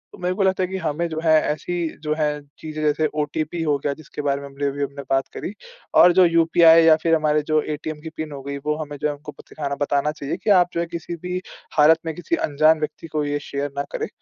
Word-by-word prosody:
तो - - -16
मेरे 180 +1 -1
को 195 - +1
लगता 190 0 +2
है - - 0
कि 190 - -3
हमें 165 -1 -2
जो 160 -1 -4
है 160 - +3
ऐसी 155 +4 -2 0.3
जो 150 0 0
है 150 -1 -1 0.2
चीज़ें 155 -1 -6
जैसे 150 +1 +2 0.2
ओटीपी 155 +3 -3
हो 150 -2 +1
गया 140 +1 -2
जिसके 150 0 -8
बारे 140 -1 -1
में 140 - -8
हमने 140 +1 -5
अभी 140 +1 -2
हमने 140 0 -5
बात 135 0 +1
करी, 200 - -5 0.4
और 180 - +7
जो 185 0 +6
यूपीआई 165 0 +6
या 160 -1 +7
फिर 165 -1 +3
हमारे 150 -1 +2
जो 155 -1 +3
एटीएम 155 0 -5
की 160 - -7
पिन 155 -1 -4
हो 140 -1 -7
गयी 140 +1 -4
वो 150 0 +1
हमें 145 -1 -6
जो 150 - -1
है 150 - -2
उनको 145 +1 -10
बत - - -16
दिखाना 140 -2 -4
बताना 145 +1 +1
चाहिए 150 +1 -5
कि - - -1
आप 175 0 +2
जो - - -1
है 170 - 0
किसी 170 0 -6
भी 180 0 -2 0.4
हालत 155 +2 +6
में 160 - -2
किसी 175 - -1
अनजान 155 - +3
व्यक्ति 155 +2 -5
को 155 -1 -2
ये 145 0 -1
शेयर 140 0 -3
ना 140 - 0
करें। - - -3
155 Hz, 260 wpm, -22 LUFS, 145-165 Hz, 0.4 s, और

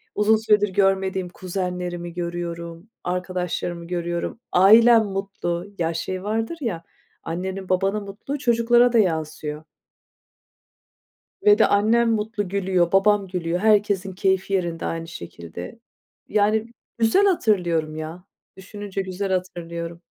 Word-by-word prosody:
uzun 210 +1 +4
süredir 210 -2 +3
görmediğim 190 -2 +1
kuzenlerimi 180 -2 -4
görüyorum, 170 +1 -5
arkadaşlarımı 180 -1 -3
görüyorum, 175 +4 -3
ailem 225 +4 +7
mutlu, 195 -3 -3
ya 165 -1 0
şey 185 +3 -4
vardır 225 +9 -2
ya, 175 -9 -3 0.4
annenin 185 +3 -4
babanın 195 +3 +1
mutluluğu 210 +9 -6
çocuklara 240 0 +3
da 230 - +5
yansıyor. 155 -4 -1 1.8
Ve 415 0 +7
de - - +5
annem 225 +3 +3
mutlu 210 -3 -2
gülüyor, 185 -3 +1
babam 200 0 +3
gülüyor. 175 -1 -2
Herkesin 200 -2 +2
keyfi 190 +1 0
yerinde 175 -3 -1
aynı 165 0 -3
şekilde, 85 - -9 0.5
yani, 215 +1 +2 0.3
güzel 230 - +4
hatırlıyorum 175 - +1
ya, 160 +3 -7 0.3
düşününce 200 +1 -6
güzel 190 +1 -4
hatırlıyorum. 170 -2 -4
190 Hz, 115 wpm, -23 LUFS, 175-210 Hz, 1.8 s, ailem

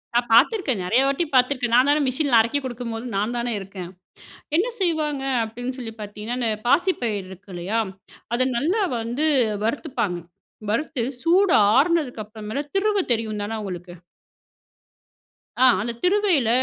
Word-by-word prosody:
நான் 240 0 +2
பாத்திருக்கேன். 265 - +3
நிறையா 235 +9 +3
வாட்டி 275 +5 0
பாத்திருக்கேன். 250 -2 +2
நான் 255 +3 +5
தானே 300 +1 +3
மெஷின்ல 260 -2 +2
அரைக்க 235 +6 +2
குடுக்கும்போது, 240 -1 -5
நான் 215 +5 -1
தானே 240 0 -1
இருக்கேன். 190 -2 -8 0.7
என்ன 405 +8 +2
செய்வங்க 305 -6 0 0.2
அப்படின்னு 245 +3 -5
சொல்லி 225 -3 -6
பாத்தீங்கன்னா, 210 +3 -5
இந்த 230 - +1 0.2
பாசிப்பயிர் 235 - +1
இருக்கு 190 +2 -13
இல்லையா, 190 +6 -1 0.5
அதை 255 +1 +2
நல்ல 315 - +1 0.2
வந்து 240 +7 -1 0.4
வறுத்துப்பாங்க. 230 - -2 0.5
வறுத்து, 255 +2 -1 0.2
சூடு 360 +2 +4 0.2
அருனதுக்கு 295 -7 +1
அப்புறம்மேல, 215 +5 -5
திருவ 405 0 +2
தெரியும் 220 -2 -2
தானே 220 +2 -3
உங்களுக்கு. 180 -2 -7 1.7
ஆ. - - +8 0.2
அந்த 235 +2 -3
திருவையில 360 - +3
245 Hz, 135 wpm, -23 LUFS, 220-295 Hz, 1.7 s, ஆ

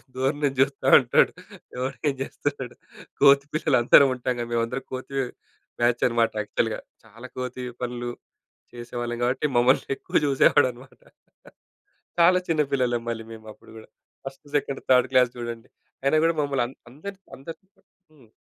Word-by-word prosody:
దూరం 135 +3 0
నుంచి 135 -2 0
చూస్తా 135 0 0
ఉంటాడు. - - +3 0.5
ఎవరు 130 +1 -3
ఏం 140 - -2
చేస్తున్నాడు. 135 -3 -5 0.5
కోతి 140 0 +6
పిల్లలు 155 -3 +2
అందరం 135 +3 +7
ఉంటాం 125 0 -2
కదా! 120 - -3
మేమందరం 115 +3 -2
కోతి 130 +1 -6 0.7
బ్యాచ్ 120 0 +2
అన్నమాట 115 -1 +1
యాక్చువల్‌గా. 110 +1 -2 0.3
చాలా 115 +3 -12
కోతి 125 0 -5 0.2
పనులు 120 0 -4 0.7
చేసేవాళ్ళం. 120 0 -5
కాబట్టి 130 +4 0
మమ్మల్ని 125 +2 +3
ఎక్కువ - - -5
చూసేవాడు 135 -2 +4
అన్నమాట. 125 +2 -17 1.2
చాలా 180 +2 +6
చిన్న 160 -2 +2
పిల్లలం 125 -3 0
మళ్ళీ 115 -1 -5
మేము 110 -1 -12
అప్పుడు - - -19
కూడా 110 - -14 0.4
ఫస్ట్, 135 +2 -9
సెకండ్, 140 -1 -2
థర్డ్ 130 0 +5
క్లాస్ 125 -2 +4
చూడండి. 120 0 -7 0.3
అయినా 140 +3 +2
కూడా 165 0 +1
మమ్మల్ని 140 -3 0
అం 125 - -11 0.2
అందరి‌‌ని, 190 +9 -9 0.2
అందరి‌‌ని 165 +8 -11 0.4
హ్మ్. 135 -7 -21
130 Hz, 145 wpm, -25 LUFS, 120-140 Hz, 1.2 s, అందరం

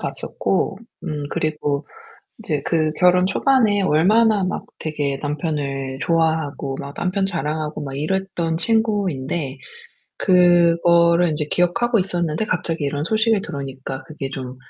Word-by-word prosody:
봤었고 195 +1 -2 0.3
음 150 -4 -3
그리고 150 -2 -2 0.5
이제 155 -9 -2
그 155 -2 +1
결혼 180 +2 +4
초반에 215 -2 +2
얼마나 205 +6 +3
막 185 - -3
되게 145 -3 -2
남편을 145 -3 -3
좋아하고 160 -4 0
막 140 +1 -7
남편 190 +2 -1
자랑하고 155 -3 -3
막 135 -1 -6
이랬던 170 +1 -1
친구인데 175 - -1 0.6
그거를 170 -1 +4
인제 150 -1 -2
기억하고 230 +7 +2
있었는데 175 -2 -1
갑자기 165 -4 -2
이런 145 +1 -2
소식이 220 +4 +2
들어오니까 135 -4 -6
그게 145 -4 -6
좀 130 -2 -6
165 Hz, 295 characters per minute, -21 LUFS, 145-185 Hz, 0.6 s, 결혼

